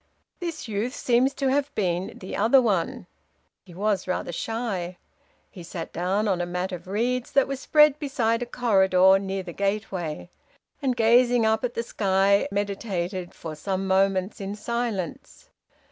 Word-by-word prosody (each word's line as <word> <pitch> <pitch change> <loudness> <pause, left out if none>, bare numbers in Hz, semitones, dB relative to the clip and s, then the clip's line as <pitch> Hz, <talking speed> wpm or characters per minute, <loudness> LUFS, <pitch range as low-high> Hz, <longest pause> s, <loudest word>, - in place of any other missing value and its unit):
"This 335 -6 -5
youth 220 +4 -2
seems 250 +2 +2
to 270 -2 0
have 285 +1 +1
been 180 -2 -1
'the 185 - -7
other 250 +4 +5
one'; 230 0 0 0.6
he 175 -3 -15
was 200 -1 0
rather 180 -1 -2
shy. 190 -3 -3 0.5
He 180 - -11
sat 170 0 -7
down 190 +5 0
on 185 -3 +1
a - - -1
mat 180 +2 -3
of 180 0 -7
reeds 240 +5 -1
that 275 - +4
was 275 -1 -4
spread 300 0 +4
beside 240 -5 0
a 245 - -3
corridor 190 -5 +4
near 195 0 -3
the 175 -2 -8
gateway; 195 -5 -3 0.5
and, 260 -3 0
gazing 240 +1 +4
up 220 +1 +2
at 245 -1 -2
the 230 - -1
sky, 200 -2 +2
meditated 195 -3 -3
for 160 -2 -7
some 190 +5 -3
moments 190 +1 +1
in 195 +1 -4
silence. 220 -5 -4
200 Hz, 160 wpm, -25 LUFS, 185-240 Hz, 0.6 s, other